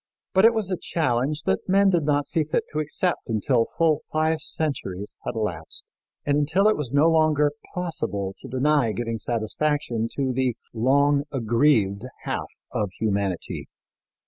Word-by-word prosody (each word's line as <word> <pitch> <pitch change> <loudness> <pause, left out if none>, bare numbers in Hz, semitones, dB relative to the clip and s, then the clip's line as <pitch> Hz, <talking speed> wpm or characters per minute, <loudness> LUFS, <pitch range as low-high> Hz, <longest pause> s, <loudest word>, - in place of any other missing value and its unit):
But 190 +3 +5
it 230 0 +6
was 210 -4 -2
a 185 - 0
challenge 145 0 0
that 95 - -1
men 195 +1 +5
did 175 -2 +2
not 145 -1 +2
see 160 +2 +1
fit 150 - -1
to 155 - -2
accept 155 +1 -1
until 115 +2 +2
full 160 -2 +3
five 155 0 +1
centuries 105 - -3
had - - -2
elapsed, 95 -8 -4 0.4
and 145 0 +2
until 170 +8 +3
it 215 - +4
was 140 -5 -4
no 145 +3 +4
longer 155 -2 +3 0.2
possible 100 - -2
to - - -9
deny 130 -2 +2
giving 115 -1 -3
satisfaction 120 +1 -1
to 135 -2 -1
the 125 -2 0 0.2
long 140 +4 +3
aggrieved 115 -4 +2 0.2
half - - -3 0.2
of 105 -2 -1
humanity. 100 -5 -2
140 Hz, 155 wpm, -24 LUFS, 115-155 Hz, 0.4 s, it